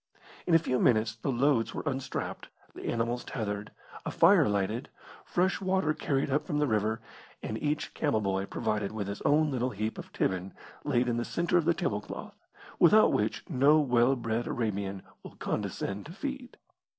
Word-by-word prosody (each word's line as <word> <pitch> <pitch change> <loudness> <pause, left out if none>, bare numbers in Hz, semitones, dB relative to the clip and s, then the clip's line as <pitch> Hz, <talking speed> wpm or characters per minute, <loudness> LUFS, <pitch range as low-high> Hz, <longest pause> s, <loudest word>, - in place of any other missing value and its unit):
In 170 - +5
a - - +10
few 130 -6 0
minutes 110 -2 +3
the 135 - -2
loads 120 -3 +2
were - - -3
unstrapped, 135 -3 -3 0.3
the - - -9
animals 120 +1 -1
tethered, 105 -4 -4 0.3
a - - -3
fire 165 - +5
lighted, 105 +6 -1 0.4
fresh 185 +3 +1
water 185 -5 +1
carried 140 -2 -1
up 145 - +2
from 150 - -1
the 150 - +3
river, 110 -2 0 0.4
and 110 - -4
each 150 0 -1
camel 145 -8 +1
boy 100 -1 -1
provided 105 -2 -2
with 105 -3 -3
his 100 0 -5
own 150 +1 +3
little 125 -1 0
heap 110 -1 -3
of - - -9
tibbin 95 0 -1 0.3
laid 120 +1 +1
in 120 -1 0
the 120 - 0
centre 175 +6 +1
of 165 - -2
the 170 0 +3
table 105 - -1
cloth, - - -10 0.3
without 215 +5 +6
which 105 0 -1
no 145 +1 +4
well 125 -2 +3
bred 115 -1 -2
Arabian 100 -4 -2 0.2
will - - -11
condescend 100 +4 -3
to 165 - -9
feed. 270 +2 -6
120 Hz, 180 wpm, -29 LUFS, 110-150 Hz, 0.4 s, a